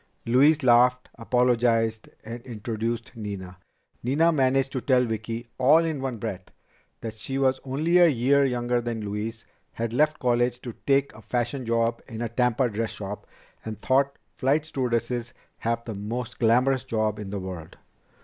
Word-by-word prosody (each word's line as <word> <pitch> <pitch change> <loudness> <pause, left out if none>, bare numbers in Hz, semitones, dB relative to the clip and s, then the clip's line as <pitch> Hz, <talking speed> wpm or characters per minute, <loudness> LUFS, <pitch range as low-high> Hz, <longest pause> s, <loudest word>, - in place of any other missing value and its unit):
Louise 145 +6 +4
laughed, 125 +1 +4
apologized, 115 -2 +1 0.2
and 115 +2 -6
introduced 115 0 -4
Nina. 95 -4 -7 0.4
Nina 150 +7 +3
managed 135 -2 +2
to 130 - -3
tell 125 -1 +3
Vicki, 115 +1 -4
all 155 +6 +5
in 155 -4 -2
one 130 -3 -3
breath, 100 -4 -5 0.6
that 110 -2 -5
she 135 +5 -5
was 130 -1 +2
only 155 +7 +2
a 175 - +8
year 140 0 +3
younger 120 -2 0
than 115 -2 -4
Louise, 105 +3 -4 0.3
had 115 0 -3
left 150 +4 +2
college 120 0 +1
to 120 - -6
take 140 0 +3
a - - -13
fashion 120 +1 -2
job 115 0 +1
in 115 -4 -7
a 115 - -2
Tampa 125 +2 +2
dress 110 0 -2
shop, 100 0 -7 0.4
and 110 -1 -5
thought 140 +1 +2 0.2
flight 145 +4 +2
stewardesses 120 -3 -2 0.2
"have 115 0 -2
the 115 - -4
most 110 +4 -5
glamorous 125 +2 +3
job 110 -2 -1
in 105 -2 -6
the 100 0 -3
world." 90 -4 -8
120 Hz, 160 wpm, -26 LUFS, 115-130 Hz, 0.6 s, a